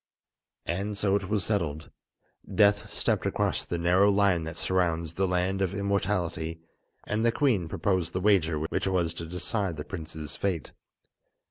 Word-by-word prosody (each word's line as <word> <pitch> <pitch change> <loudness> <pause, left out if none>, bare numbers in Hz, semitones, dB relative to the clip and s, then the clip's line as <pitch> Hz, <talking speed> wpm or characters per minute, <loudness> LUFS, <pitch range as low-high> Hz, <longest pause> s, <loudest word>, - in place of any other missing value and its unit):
And 100 +4 -2
so 100 -1 +2
it 100 -2 -2
was 105 -3 +1
settled. 80 -8 -2 0.6
Death 100 +1 +3
stepped - - 0
across - - -1
the 85 - -2
narrow 90 +4 +4
line 100 -5 +3
that 80 - -6
surrounds 85 -3 0
the 95 +2 +1
Land 90 +2 0
of 95 0 0
Immortality, 95 -5 -1 0.5
and 110 +1 -1
the 115 - +4
queen 115 - +1
proposed 90 -1 0
the 90 - 0
wager 90 -5 +3
which 80 +5 -2
was 90 -4 +1
to 85 0 -6
decide 90 +1 -2
the 75 - -4
prince's 80 -5 -6
fate. 90 -7 -2
90 Hz, 155 wpm, -28 LUFS, 85-100 Hz, 0.6 s, narrow